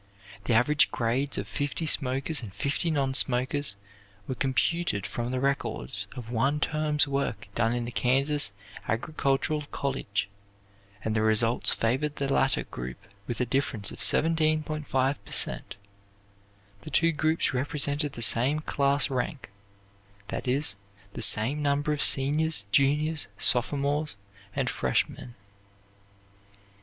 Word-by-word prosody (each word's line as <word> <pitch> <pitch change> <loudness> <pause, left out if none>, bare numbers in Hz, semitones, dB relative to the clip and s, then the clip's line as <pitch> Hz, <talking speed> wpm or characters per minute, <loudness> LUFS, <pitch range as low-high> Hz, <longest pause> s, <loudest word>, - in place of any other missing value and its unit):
The 120 - +1
average 145 +6 +3
grades 125 +4 -1
of 100 - -4
fifty 145 +7 -3
smokers 135 +1 +1
and 110 -5 -8
fifty 140 - -1
non 140 -4 0
smokers 130 -2 +1 0.5
were - - -2
computed 135 - 0
from 120 0 -4
the 130 0 -2
records 100 - -1
of 120 -2 -8
one 135 +5 +1
term's 155 -1 +1
work 135 -6 -3
done 115 +1 +1
in 120 -1 -3
the 120 - -6
Kansas 135 0 +2 0.4
Agricultural 140 +4 -1
college 105 -8 -2 0.8
and 110 - -2
the 110 - +1
results 110 +2 +2
favored 130 +6 -1
the 140 -1 -1
latter 135 - +2
group 60 0 -7 0.3
with 120 - -3
a - - +1
difference 120 -5 0
of - - -10
17.5 155 -4 +2
per - - -15
cent. - - +1 1.1
The - - -9
two 165 +4 +3
groups 155 0 0
represented 145 +2 -1
the 120 - -1
same 125 +8 +4
class 140 -1 +1
rank; 130 - -4 0.8
that - - -5
is, 130 -5 +1 0.4
the - - -6
same 110 +8 +3
number 145 +1 0
of 145 - -3
seniors, 150 -2 +3
juniors, 150 +5 +2
sophomores, 140 +1 +1 0.4
and - - -1
freshmen." 120 - -2
135 Hz, 130 wpm, -27 LUFS, 120-150 Hz, 1.1 s, same